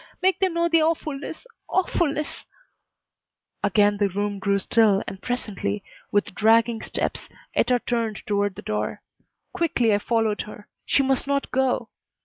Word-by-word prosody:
Make 375 0 +2
them 375 -3 +1
know 340 0 +2
the 330 -1 +4
awfulness 310 - -2 0.2
awfulness 305 -5 0 0.6
" - - -54
Again 205 0 +3
the 200 -1 +2
room 205 +1 -2
grew 200 0 +2
still 205 0 +3
and 190 - -7
presently, 210 -4 -2 0.3
with 205 -2 +1
dragging 225 +2 +3
steps, - - -2 0.2
Etta 250 -1 +3
turned 230 -3 -1
toward 205 -1 0
the - - -9
door. 105 - -3 0.5
Quickly 290 - +2
I 205 - +3
followed 225 -1 0
her. 210 -1 -11 0.2
She 275 - +3
must 265 0 +1
not 280 0 0
go. 255 -3 +1
225 Hz, 145 wpm, -24 LUFS, 205-280 Hz, 0.6 s, the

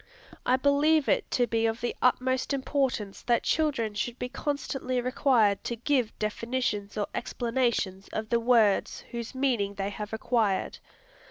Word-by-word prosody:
I 255 - +5
believe 285 +3 +3
it - - +1
to 245 - +2
be 225 -1 +1
of 225 +1 -2
the 240 - -2
utmost 260 +2 +1
importance 265 -7 -1
that 240 -1 +1
children 275 -9 0
should 235 +3 -3
be 250 - -4
constantly 270 -2 -2
required 245 -5 +2
to 235 - -2
give 245 -1 0
definitions 215 -1 -2
or 205 - +1
explanations 235 -6 -1
of 220 0 -4
the 235 - +2
words 230 -4 +3
whose 235 +1 -6
meaning 240 -7 0
they 195 0 -2
have 210 +1 -6
acquired. 220 -3 0
240 Hz, 150 wpm, -28 LUFS, 215-260 Hz, -, I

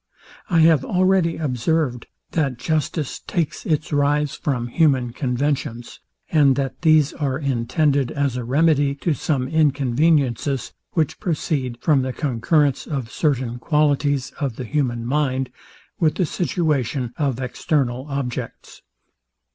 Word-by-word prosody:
I 170 -4 +4
have 160 -4 +5
already 185 0 +2
observed, 135 -2 -1 0.2
that 140 -6 0
justice 155 +1 -2
takes 170 -5 -3
its 155 -1 -1
rise 145 0 +2
from 125 -5 -2
human 130 -5 +2
conventions; 125 -2 -2 0.3
and 145 -4 +5
that 135 -1 -3
these 155 -4 +4
are 135 -3 -2
intended 140 0 +1
as 140 -4 -1
a 125 - -3
remedy 145 +2 +2
to 160 +3 -1
some 135 -1 -1
inconveniences, 140 -3 +1 0.2
which 160 -4 0
proceed 145 - -2
from 145 -4 +3
the 130 0 -3
concurrence 145 +2 +1
of 135 -6 -4
certain 130 -6 -1
qualities 145 -2 +1
of 135 -6 -2
the 125 - -6
human 120 -4 -1
mind 130 -1 0 0.5
with 155 -3 +2
the 185 - +1
situation 145 - -1
of 135 -5 -1
external 130 0 -1
objects. 135 -3 -5
140 Hz, 125 wpm, -22 LUFS, 125-155 Hz, 0.5 s, have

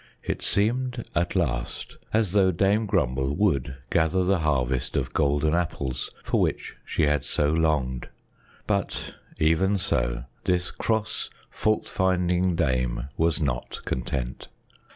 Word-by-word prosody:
It - - -3
seemed 120 +4 0
at 85 +2 0
last 65 -9 -2
as 110 -4 +2
though 95 -1 +4
Dame 100 +5 +2
Grumble 65 -3 +1
would 70 -10 +1 0.2
gather 85 +3 +3
the 95 0 +2
harvest 65 -5 0
of 65 -2 -2
golden 75 +2 +2
apples 70 -7 -1
for - - +1
which - - -1
she - - -1
had 75 -2 +2
so 75 0 +1
longed; 75 -6 0 0.6
but - - -1 0.2
even 95 +6 +3
so, - - 0 0.2
this 90 -1 +1
cross, 110 -1 -1 0.2
fault 110 0 0
finding 90 -1 +1
dame 65 -5 0
was 80 0 +2
not 65 -6 -2
content. 65 0 -3
80 Hz, 130 wpm, -26 LUFS, 65-95 Hz, 0.6 s, though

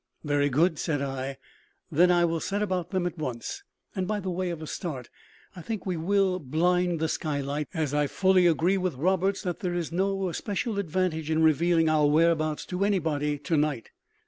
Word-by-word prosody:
"Very 145 -1 +1
good," 160 +4 +2
said 150 -4 -1
I; 135 -1 -4 0.5
"then 175 +4 +5
I 175 -1 +4
will 165 -1 0
set 205 +5 -1
about 185 -4 -2
them 185 -2 -1
at 175 -2 -4
once. 130 - -5 0.3
And, 185 -2 -1
by 210 0 -1
way 185 -1 -2
of 170 -2 -4
a 160 - -7
start, 145 -7 -5 0.4
I 180 - -8
think 220 +4 -5
we 185 -2 -1
will 185 +2 +1
`blind' 175 +5 +1
the 160 +1 0
skylights; 145 -2 -2
as 155 -3 -1
I 150 0 +2
fully 185 +2 +3
agree 175 +4 +2
with 185 -5 -1
Roberts 190 +7 +1
that 180 -3 -3
there 180 -2 -2
is 170 -2 -3
no 195 +2 0
especial 205 +4 -2
advantage 170 -3 -1
in 160 0 +2
revealing 165 +2 +3
four 155 -2 +3
whereabouts 155 0 +2
to 185 +1 -2
anybody 155 -7 0
to 145 +3 -2
night. 145 -6 -1
170 Hz, 190 wpm, -27 LUFS, 150-185 Hz, 0.5 s, then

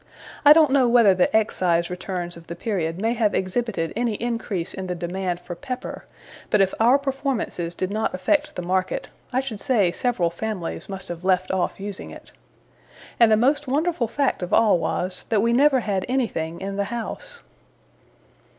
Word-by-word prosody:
I 295 - +8
don't 305 -2 +7
know 265 -3 +4
whether 235 -5 +6
the 180 -1 +2
Excise 175 -5 +1
returns 180 -1 -4
of 170 -1 -14
the 170 - -6
period 175 -4 -2
may 225 +3 +1
have 220 -3 +1
exhibited 190 -3 -1
any 235 -1 0
increase 225 -6 -3
in 190 -1 -5
the 180 - -2
demand 175 +1 -3
for 175 - -7
pepper; 255 +8 -6 0.4
but 210 - +3
if 195 -1 +3
our 240 +5 +6
performances 270 - -3
did 185 +1 -2
not 220 +2 0
affect 185 +11 0
the 180 - -4
market, 185 +1 -1 0.2
I 260 +1 +1
should 240 -6 -6
say 215 -10 +2
several 185 -5 0
families 190 -1 -5
must 195 -1 -6
have 175 0 -6
left 185 -1 +1
off 190 0 -1
using 200 -1 -6
it. - - -12 0.9
And 230 -2 +6
the 215 - +6
most 285 +5 +2
wonderful 295 -1 0
fact 275 +1 0
of 180 - -4
all 215 -6 +4
was, 180 +2 -2
that 215 -2 +2
we 235 0 +2
never 270 0 +4
had 195 -4 -1
anything 170 -11 -2
in 195 +1 -4
the 200 - 0
house. 470 - -6
205 Hz, 180 wpm, -23 LUFS, 180-245 Hz, 0.9 s, I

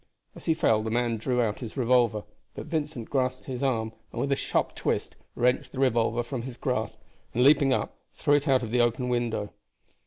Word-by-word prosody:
As - - -12
he 160 - +2
fell 110 -7 +3
the 110 - -3
man 120 0 0
drew 125 +2 +1
out 105 -2 -2
his 120 +1 -7
revolver, 120 -4 +3 0.3
but - - -6
Vincent 150 -7 -3
grasped 130 -2 0
his 125 -2 -5
arm 115 -5 0 0.2
and - - -6
with 140 - -1
a - - +4
sharp - - 0
twist - - -2 0.2
wrenched 125 +2 +1
the 130 - -5
revolver 120 -2 +2
from 125 0 -4
his 125 0 -7
grasp, - - -2 0.4
and 125 - +3
leaping 140 0 +5
up, 130 - 0 0.2
threw 145 - +2
it 145 +1 +2
out 130 -2 +3
of 110 - -5
the 125 0 +3
open 120 +1 +1
window. 120 -4 -1
125 Hz, 210 wpm, -27 LUFS, 115-135 Hz, 0.4 s, leaping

